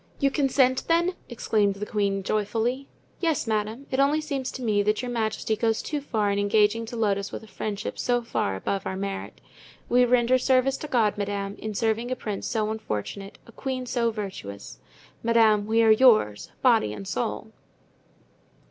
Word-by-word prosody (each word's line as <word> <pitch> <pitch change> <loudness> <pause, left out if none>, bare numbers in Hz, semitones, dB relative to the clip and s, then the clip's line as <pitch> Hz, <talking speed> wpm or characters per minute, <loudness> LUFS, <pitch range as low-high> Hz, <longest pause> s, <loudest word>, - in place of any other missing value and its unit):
"You 275 -2 +2
consent 265 -2 +2
then?" 340 +2 +2 0.2
exclaimed 210 -4 +1
the 205 +1 -5
queen, 200 -2 -1
joyfully. 225 +6 -1 0.3
"Yes, 325 -6 0
madame; 220 +4 -2
only 280 +3 +3
it 310 - -3
seems 275 -4 -3
to 260 - -6
me 210 -3 +2
that 210 +4 0
your 245 - -3
majesty 220 -1 -1
goes 225 0 0
too 295 -2 -3
far 215 -7 0
in 200 - 0
engaging 210 +2 +2
to 235 - -7
load 205 -3 +1
us 200 - -6
with - - -7
a - - -13
friendship 205 +1 -5
so 245 -1 +1
far 100 - -1
above 190 - -3
our 190 0 -3
merit. 195 0 -5 0.5
We 250 +1 +5
render 250 +1 +3
service 260 +1 +2
to 300 - -6
God, 220 -6 +1
madame, 200 0 -3
in 215 -1 -5
serving 225 +3 0
a 255 - -1
prince 210 -5 -4
so 215 -2 -1
unfortunate, 195 - -5
a - - -15
queen 255 +1 -4
so 240 -1 0
virtuous. 190 - -7 0.4
Madame, 220 -3 +3
we 225 +1 +3
are 220 - +6
yours, 215 - +4
body 230 - +4
and 100 -2 -8
soul." - - -3
220 Hz, 180 wpm, -26 LUFS, 205-250 Hz, 0.5 s, are